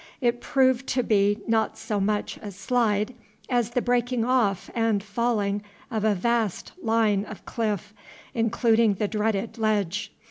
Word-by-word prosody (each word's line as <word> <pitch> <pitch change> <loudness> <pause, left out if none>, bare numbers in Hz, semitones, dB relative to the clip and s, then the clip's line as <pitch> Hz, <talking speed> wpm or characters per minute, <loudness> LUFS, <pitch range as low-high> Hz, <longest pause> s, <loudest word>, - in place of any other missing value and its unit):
It 240 -2 +1
proved 260 -1 +2
to 250 -1 +1
be 205 -1 +2
not 225 -1 +1
so 220 -2 -2
much 205 +1 -1
a 210 - -6
slide 210 +2 0 0.4
as 240 -3 +1
the 240 +1 -1
breaking 245 -1 +1
off 230 -7 +1
and 225 -4 +1
falling 205 -1 0 0.3
of 220 -2 -1
a 215 -2 +3
vast 225 0 0
line 220 - +2
of 215 - -10
cliff, 210 -3 -2 0.4
including 225 -1 +3
the 210 +2 -1
dreaded 215 +1 -1
Ledge. 205 -2 0
220 Hz, 145 wpm, -26 LUFS, 205-235 Hz, 0.4 s, a